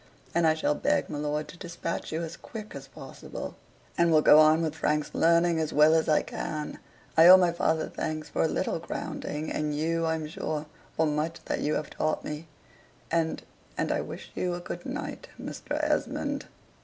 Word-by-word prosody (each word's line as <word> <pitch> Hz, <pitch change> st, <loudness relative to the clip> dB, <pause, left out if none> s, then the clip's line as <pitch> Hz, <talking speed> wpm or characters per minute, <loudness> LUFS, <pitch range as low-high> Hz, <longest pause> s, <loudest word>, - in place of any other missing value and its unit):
And 170 Hz, -1 st, +3 dB
I 155 Hz, -, +4 dB
shall 155 Hz, -, +1 dB
beg -, -, 0 dB
my 145 Hz, -, -3 dB
lord 150 Hz, +1 st, -2 dB
to 180 Hz, -, -12 dB
despatch 170 Hz, -2 st, -4 dB
you 160 Hz, +2 st, -2 dB
as 165 Hz, +1 st, -5 dB
quick 215 Hz, -2 st, -9 dB
as 135 Hz, -1 st, -8 dB
possible: 135 Hz, 0 st, -8 dB, 0.4 s
and 170 Hz, -1 st, +3 dB
will 155 Hz, -1 st, +5 dB
go 150 Hz, -, +8 dB
on 155 Hz, +1 st, +6 dB
with 155 Hz, -2 st, -1 dB
Frank's 150 Hz, -1 st, -1 dB
learning 170 Hz, 0 st, +3 dB
as 155 Hz, -1 st, -1 dB
well 150 Hz, +1 st, +6 dB
as 160 Hz, -1 st, +2 dB
I 155 Hz, -, +4 dB
can, 150 Hz, -1 st, -5 dB, 0.4 s
(I 165 Hz, +1 st, +8 dB
owe 185 Hz, +1 st, +11 dB
my 180 Hz, -2 st, +3 dB
father 160 Hz, -2 st, 0 dB
thanks 155 Hz, 0 st, -4 dB
for -, -, -2 dB
a -, -, +4 dB
little -, -, -1 dB
grounding, 150 Hz, +1 st, -4 dB
and 150 Hz, -1 st, -1 dB
you, 165 Hz, +2 st, 0 dB
I'm 160 Hz, -1 st, -1 dB
sure, 155 Hz, 0 st, -3 dB, 0.3 s
for 160 Hz, -, +3 dB
much 155 Hz, +2 st, -2 dB
that -, -, -1 dB
you 150 Hz, -, 0 dB
have 150 Hz, -, -3 dB
taught 155 Hz, -, -1 dB
me,) 150 Hz, +2 st, -5 dB, 0.6 s
and 165 Hz, -1 st, 0 dB, 0.3 s
and -, -, 0 dB
I -, -, +1 dB
wish -, -, -8 dB
you 180 Hz, -1 st, -1 dB
a -, -, -5 dB
good 175 Hz, 0 st, -7 dB
night, -, -, -5 dB
Mr. -, -, -6 dB
Esmond." -, -, -1 dB
160 Hz, 195 wpm, -28 LUFS, 150-165 Hz, 0.6 s, owe